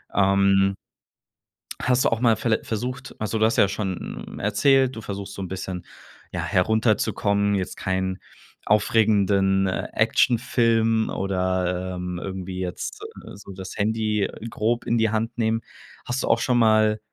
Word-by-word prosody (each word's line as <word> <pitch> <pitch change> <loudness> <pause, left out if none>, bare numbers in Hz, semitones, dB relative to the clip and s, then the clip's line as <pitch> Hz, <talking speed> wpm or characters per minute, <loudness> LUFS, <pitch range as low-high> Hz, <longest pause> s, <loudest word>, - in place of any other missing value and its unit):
Ähm 100 0 +3 1.1
hast 125 +1 +2
du - - +5
auch 115 - -1
mal 115 -2 +4
viell 115 0 0
versucht 125 +4 -5
also, 110 +1 -2
du 110 - +4
hast 115 - +1
ja 100 - +5
schon 95 -2 -5
erzählt, 130 +5 +3
du 110 - -6
versuchst 100 -1 -6
so - - -7
'n 95 - -4
bisschen 95 -1 -5 0.5
ja - - -3
herunterzukommen, 100 0 +1
jetzt 95 -2 -3
keinen 95 0 -2 0.5
aufregenden, 100 -2 +3
äh, 90 - -2
Actionfilm 115 -2 +2
oder, 95 -1 -1
ähm, 90 0 -4
irgendwie 95 -1 -5
jetzt 90 -2 -4 0.2
so - - -11
so 100 -1 -11
das 95 0 -8
Handy 105 -1 0 0.2
grob 115 +3 -1
in 115 - +1
die 110 -1 +2
Hand 110 +2 -2
nehmen. 115 0 +1 0.4
Hast 125 +2 -2
du - - -2
auch 115 - +3
schon 125 0 +1
mal, 110 -1 +4
105 Hz, 150 wpm, -24 LUFS, 95-115 Hz, 1.1 s, du